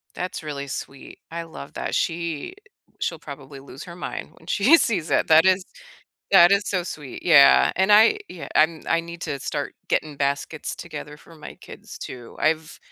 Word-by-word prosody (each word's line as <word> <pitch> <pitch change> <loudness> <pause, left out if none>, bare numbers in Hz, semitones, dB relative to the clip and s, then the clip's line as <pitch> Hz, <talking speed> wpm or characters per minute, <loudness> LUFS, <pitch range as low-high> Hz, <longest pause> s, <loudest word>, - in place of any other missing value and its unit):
That's 180 -2 -5
really 140 -2 -5
sweet. 135 0 -8
I 170 0 -4
love 160 -3 -11
that. - - -3
She 170 - -2 0.5
she'll 165 - -3
probably 140 -2 -10
lose 135 +1 -11
her 170 - -10
mind 180 - -6
when 160 - -20
she 235 - +5
sees 205 - -1
it. - - +2
That 160 +2 +6
is 190 0 +3 0.7
that 175 -2 +7
is 200 +1 +3
so 185 -3 -1
sweet. 150 -6 -8
Yeah, 65 0 +6
and 190 +2 +2
I, 220 - +6
ye 170 - -10
I 160 +1 +3
I 165 - +2
need 170 0 -9
to 140 - -4
start - - -4
getting 150 -2 -1
baskets 140 +2 -2
together 150 -3 -8
for 165 +2 -17
my 155 - -11
kids, - - -11
too. 120 -2 -9
I've 160 +1 0
160 Hz, 180 wpm, -23 LUFS, 145-175 Hz, 0.7 s, that